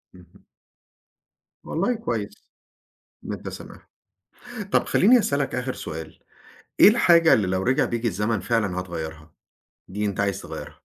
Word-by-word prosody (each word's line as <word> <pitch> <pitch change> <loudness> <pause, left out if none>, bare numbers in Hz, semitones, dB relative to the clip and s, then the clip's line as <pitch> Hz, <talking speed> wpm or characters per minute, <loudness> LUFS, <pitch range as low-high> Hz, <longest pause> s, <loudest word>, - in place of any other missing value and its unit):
اهم. 90 +2 -19 1.2
والله 195 +9 -1
كويس. 115 - -5 0.8
إن - - -4
أنت - - -7
سامحته، - - -11 0.9
طب - - +3
خليني 240 +6 +5
أسألك 140 - -1
آخر 125 +1 -3
سؤال، 80 0 -8 0.6
إيه - - +10
الحاجة 170 -7 +5
اللي 100 -4 +3
لو 95 +1 -1
رجع 125 +4 +2
بيك 120 0 -3
الزمن 105 +1 -1
فعلًا 100 -3 -1
هتغيرها؟ 80 -3 -7 0.6
دي 105 +3 -4
أنت 100 0 -2
عايز 100 -1 -1
تغيرها؟ - - -8
105 Hz, 135 wpm, -24 LUFS, 90-135 Hz, 1.2 s, إيه